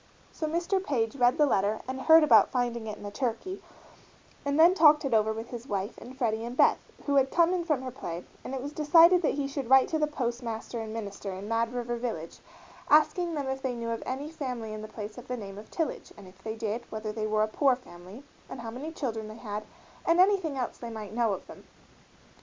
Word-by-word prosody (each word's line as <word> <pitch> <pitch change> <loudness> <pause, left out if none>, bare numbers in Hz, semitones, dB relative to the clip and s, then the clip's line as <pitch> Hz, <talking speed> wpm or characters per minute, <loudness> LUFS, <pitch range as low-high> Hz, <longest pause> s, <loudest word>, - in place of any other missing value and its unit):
So 315 - -3
Mr. 345 +4 0
Page 230 -8 -1
read 245 +2 +4
the 300 - +5
letter 210 -4 +1
and 260 0 -4
heard 320 +3 +7
about 305 - +6
finding 240 -3 -1
it 215 0 -5
in - - -12
the 205 - -6
turkey, 260 - -3 0.8
and 285 +1 0
then 340 +3 +8
talked 300 -5 +6
it 270 - -1
over 220 0 +3
with 225 +1 -6
his 240 +1 -7
wife 200 0 -3
and 255 +2 -11
Freddie 225 -3 0
and 240 +2 -6
Beth, - - +5 0.3
who 285 -1 +2
had 270 -1 +4
come 340 +3 +3
in 350 -2 -1
from 300 -6 0
her 255 - -5
play, 175 -8 -6 0.2
and 270 - -5
it 260 - -4
was 290 +1 -6
decided 330 +4 +6
that 310 - +1
he 280 -1 -1
should 275 -3 -5
write 265 0 +7
to 315 - 0
the 300 - +2
postmaster 240 -4 -4
and 220 -1 -5
minister 200 -3 -5
in 190 +2 -7
Mad 230 +1 0
River 240 -1 -3
Village 220 -10 -5 0.5
asking 330 +3 +4
them 285 -2 -2
if 265 0 -3
they 260 -3 -2
knew 230 -1 -4
of 230 - -3
any 280 +4 -4
family 250 -8 -5
in 215 - -6
the 215 - -7
place 215 +1 -7
of 245 - -13
the 250 - -3
name 200 -2 -8
of 215 - -13
Tillage, 325 -2 -3
and 200 -2 -12
if 185 +1 -17
they 220 0 -4
did, 225 +1 -4
whether 215 -1 -4
they 215 0 -3
were 215 0 +2
a - - +1
poor 265 +4 +3
family, 200 -1 -13 0.3
and 245 - -7
how 225 -1 -6
many 280 +7 -6
children 230 -9 -4
they 215 +1 -9
had, 210 -2 -5 0.4
and 335 +1 +3
anything 370 -7 +3
else 250 -2 -3
they 235 - -6
might 215 -2 -7
know 235 -1 +2
of - - -6
them. - - -13
245 Hz, 240 wpm, -28 LUFS, 220-290 Hz, 0.8 s, then